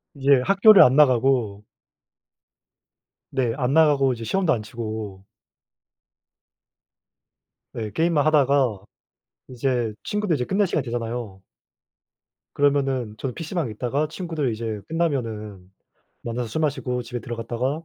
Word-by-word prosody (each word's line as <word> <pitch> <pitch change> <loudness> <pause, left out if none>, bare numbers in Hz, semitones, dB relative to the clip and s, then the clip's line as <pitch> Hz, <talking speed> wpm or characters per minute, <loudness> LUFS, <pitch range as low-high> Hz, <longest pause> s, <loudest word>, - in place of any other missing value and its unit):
이제 140 -1 +3
학교를 200 +1 +7
안 130 +2 +4
나가고 125 -7 +3 1.7
네 120 -4 0
안 130 0 0
나가고 145 -4 +4
이제 115 -1 -8
시험도 185 - +1
안 115 - -2
치고 110 -4 -6 2.5
네 110 -2 -4
게임만 160 -1 +1
하다가 140 -8 +2 0.7
이제 125 -3 -1
친구들 210 -6 -1
이제 125 -2 -2
끝날 200 +1 +1
시간이 - - -1
되잖아요. 115 -5 -5 1.1
그러면은 135 -6 0
저는 130 +1 -4
PC방에 165 - -3
있다가 130 +7 -2
친구들 160 -7 -3
이제 110 -2 -4
끝나면은 110 - -3 0.5
만나서 120 +1 -3
술 160 - -3
마시고 130 -5 -1
집에 120 0 -6
들어갔다가 120 +3 -3
125 Hz, 270 characters per minute, -23 LUFS, 115-150 Hz, 2.5 s, 학교를